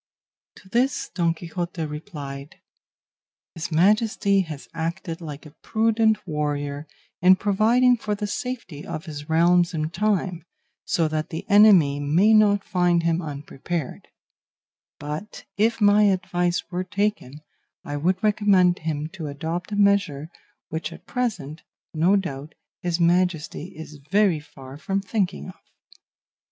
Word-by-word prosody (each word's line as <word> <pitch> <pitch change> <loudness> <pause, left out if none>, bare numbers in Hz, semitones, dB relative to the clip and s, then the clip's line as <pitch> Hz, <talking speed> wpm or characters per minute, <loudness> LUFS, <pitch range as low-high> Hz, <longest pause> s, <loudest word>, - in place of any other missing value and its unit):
To 190 - -17
this 245 +7 0
Don 170 -2 +1
Quixote 170 0 -5
replied, 150 -3 -8 1.0
"His 165 +1 -6
Majesty 200 +3 +3
has 155 -6 -7
acted 165 +1 -4
like 150 -1 -8
a 150 - -12
prudent 220 -1 +1
warrior 145 -2 -3 0.3
in 185 +1 +7
providing 225 +6 +3
for 210 -2 -2
the 210 0 -4
safety 205 - -5
of 155 - -6
his 150 -1 -8
realms 170 +2 +3
in 155 0 -2
time, 185 -3 -1 0.4
so 165 -2 +1
that 155 0 -3
the 160 - -6
enemy 200 -9 +6
may 170 +10 +3
not 205 -2 +4
find 175 -2 +1
him 170 +1 +1
unprepared; 150 0 -5 0.9
but 150 +8 -7
if 225 +3 +1
my 205 0 +5
advice 180 -2 0
were 180 +1 -2
taken 200 -7 -2 0.4
I 145 - -5
would 180 +8 0
recommend 200 -4 +3
him 155 -1 -3
to 165 -3 -7
adopt 160 +6 -4
a - - -2
measure 200 -8 +2 0.4
which 160 +1 -4
at 165 - -13
present, 205 - -3 0.3
no 170 +5 +3
doubt, 150 -6 -4 0.3
his 175 -1 -1
Majesty 170 -2 +1
is 155 -2 -10
very 195 -5 +3
far 140 -2 -12
from 195 +4 -1
thinking 195 -2 -2
of." 185 - -11
175 Hz, 135 wpm, -24 LUFS, 155-205 Hz, 1.0 s, in